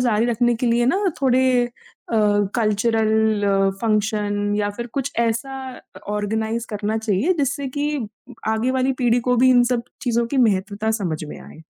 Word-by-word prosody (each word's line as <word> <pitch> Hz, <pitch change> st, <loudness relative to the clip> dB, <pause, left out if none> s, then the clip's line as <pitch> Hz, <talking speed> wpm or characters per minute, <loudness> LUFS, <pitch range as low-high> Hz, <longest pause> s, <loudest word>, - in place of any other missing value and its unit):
जारी 235 Hz, -2 st, +2 dB
रखने 240 Hz, 0 st, +2 dB
के 245 Hz, -, -2 dB
लिए 240 Hz, +1 st, +2 dB
ना 275 Hz, -, +3 dB, 0.2 s
थोड़े 260 Hz, -1 st, +3 dB, 0.2 s
अ, 240 Hz, -1 st, -8 dB, 0.4 s
कल्चरल 215 Hz, -3 st, +2 dB
फ़ंक्शन 210 Hz, -2 st, 0 dB
या 205 Hz, -1 st, 0 dB
फिर 235 Hz, +4 st, -6 dB
कुछ 280 Hz, 0 st, -2 dB
ऐसा 235 Hz, +3 st, 0 dB, 0.2 s
अ, -, -, -16 dB
ऑर्गेनाइज़ 220 Hz, +3 st, -2 dB
करना 210 Hz, +1 st, -2 dB
चाहिए 220 Hz, -, +1 dB
जिससे 280 Hz, 0 st, -1 dB
कि 290 Hz, -4 st, -1 dB, 0.4 s
आगे 220 Hz, +3 st, +1 dB
वाली 260 Hz, +1 st, +1 dB
पीढ़ी 245 Hz, -1 st, +2 dB
को 250 Hz, +1 st, +1 dB
भी 255 Hz, +2 st, +5 dB
इन 245 Hz, -1 st, +6 dB
सब 240 Hz, -1 st, 0 dB, 0.2 s
चीज़ों 235 Hz, -2 st, +1 dB
की 275 Hz, -, -3 dB
महत्वता 205 Hz, +2 st, -1 dB
समझ 185 Hz, -9 st, -2 dB
में 150 Hz, -, -9 dB
आए। 160 Hz, -, -13 dB
230 Hz, 165 wpm, -21 LUFS, 210-245 Hz, 0.4 s, इन